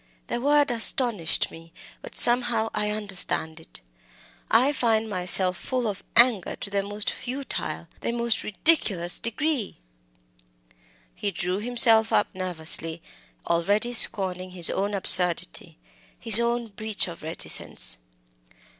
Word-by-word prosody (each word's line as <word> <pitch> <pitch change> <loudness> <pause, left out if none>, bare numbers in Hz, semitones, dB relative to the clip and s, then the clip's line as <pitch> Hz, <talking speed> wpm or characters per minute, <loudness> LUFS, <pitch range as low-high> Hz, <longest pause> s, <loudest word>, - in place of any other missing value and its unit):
_' - - -42
The 240 - -4
word 290 0 +1
astonished 230 -6 +1
me, 165 0 -15 0.3
but - - -12
sometimes 240 -2 +1
I 210 0 -2
understand 195 -6 -1
it. 160 - -11 0.7
I 250 +6 +3
find 225 -5 -1
myself 185 -1 +2
full 255 -2 -4
of 200 -3 -6
anger 235 -6 +2
to 200 - -7
the 200 0 -1
most 205 +1 -5
futile, 265 +2 -6
the - - -4
most 235 -1 -1
ridiculous 195 - 0
degree!" 265 -1 -3 1.4
He 205 - -4
drew 180 -1 -4
himself 225 -1 +2
up - - 0
nervously, 165 -3 -2 0.4
already 205 +8 -1
scorning 185 -5 +3
his 180 -2 +2
own 200 +1 -3
absurdity, 180 - +1 0.4
his 225 -1 +10
own 235 0 -2
breach 215 0 -4
of 170 -1 -11
reticence. 155 - -1
210 Hz, 125 wpm, -24 LUFS, 180-235 Hz, 1.4 s, his